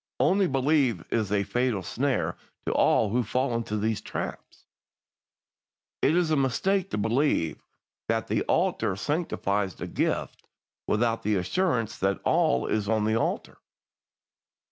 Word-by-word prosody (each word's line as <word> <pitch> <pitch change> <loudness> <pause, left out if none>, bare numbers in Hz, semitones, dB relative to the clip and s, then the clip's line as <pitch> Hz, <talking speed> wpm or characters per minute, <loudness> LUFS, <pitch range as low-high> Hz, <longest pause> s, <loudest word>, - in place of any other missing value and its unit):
'Only 195 0 +3
believe' 135 - +1
is 110 -4 0
a 100 -1 +2
fatal 120 -2 0
snare 135 +1 -1 0.3
to - - 0
all 105 - +3
who 125 +3 +2
fall 125 +3 -1
into 115 -2 -2
these 110 +1 -1
traps. - - -6 1.4
"It 150 - +3
is 170 -3 +2
a - - +4
mistake 180 +9 +1
to - - -3
believe 110 - +1 0.5
that - - 0
the - - 0
altar 110 -4 +1
sanctifies 100 - -1
the - - -6
gift - - -2 0.4
without 115 +1 +1
the 105 0 +1
assurance 115 - 0
that 95 +1 +1
all 65 0 +2
is 105 -1 -1
on 110 -1 +2
the 110 +1 +1
altar. 115 - -2
115 Hz, 140 wpm, -27 LUFS, 105-140 Hz, 1.4 s, a